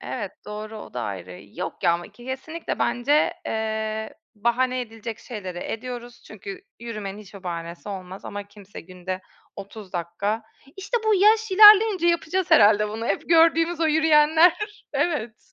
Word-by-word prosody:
Evet, 205 -6 -5
doğru, 215 +1 -7
o - - -11
da 125 - -3
ayrı. 90 -3 -6 0.2
Yok - - -5
ya 170 - +4
ama 170 +1 -2
k 210 - -14
kesinlikle 265 +6 -5
bence, 285 +5 +2
eee, 220 0 -3 0.2
bahane 250 +4 0
edilecek 225 -1 -7
şeyleri 190 -7 -7
ediyoruz. 240 +4 -7
Çünkü 390 -2 -9 0.2
yürümenin 215 -4 -6
hiç 210 -1 -14
bir 200 - -11
bahanesi 170 +1 -6
olmaz. 190 -1 -7
Ama 205 0 -5
kimse 205 -1 -12
günde 185 +1 -6 0.4
30 200 0 -10
dakika 195 +5 -2 0.3
İşte, 395 +5 -2
bu 435 - +4
yaş 430 +2 +4
ilerleyince 415 -2 +8
yapacağız 340 +2 0
herhâlde 210 0 +6
bunu. 220 +2 -5
Hep 195 - -2
gördüğümüz 330 0 +4
o 325 - +3
yürüyenler 320 +6 +3
Evet. 240 -10 -2
225 Hz, 150 wpm, -24 LUFS, 200-325 Hz, 0.4 s, ilerleyince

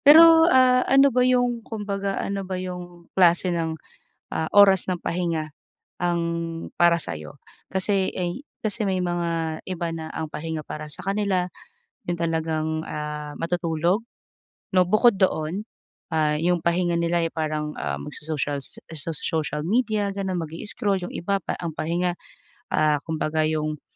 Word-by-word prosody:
Pero, 325 +3 +9
ah, 255 -3 +5
ano 275 0 +6
ba 250 - +3
yung 245 -1 +3
kumbaga 200 -3 -3
ano 200 0 -2
ba 185 - -2
yung 180 -1 -7
klase 180 0 +4
ng, 165 -2 -1 0.6
ah, 160 0 -1
oras 195 -3 +7
ng 185 - +1
pahinga, 170 -3 -1 0.5
ang 175 -1 0 0.6
para 170 -1 +4
sa'yo? 75 0 -6 0.3
Kasi, 190 0 +1
eh, 180 +10 -3 0.2
kasi 215 0 0
may 185 -1 0
mga 170 -2 -1
iba 175 -2 -3
na 160 -1 -6
ang 160 -1 -4
pahinga 155 +1 -4
para 150 0 -7
sa 150 - -5
kanila, 195 -2 0 0.6
yung 175 - 0
talagang, 160 -1 -1
ah, 150 -1 -5
matutulog, 170 +2 0 0.8
'no. 185 - +6
Bukod 215 +3 +4
doon, 185 +1 0 0.5
ah, 150 -1 +2
yung 175 +2 +1
pahinga 170 0 +1
nila 170 0 +1
ay 165 - -3
parang, 155 -1 -2
ah, 70 - -2
magso-socials 145 - -4
so 160 0 -3
social 150 -2 -2
media, 210 0 +1
ganun, 190 -2 -2
mag-i-scroll, 195 +4 -2
yung 180 - -6
iba 195 +3 0
pa - - -4
ang 170 -2 -4
pahinga, 175 +3 -1 0.6
ah, 150 -2 +2
kumbaga 155 -1 -1
yung, 155 -1 -1
175 Hz, 145 wpm, -24 LUFS, 160-195 Hz, 0.8 s, Pero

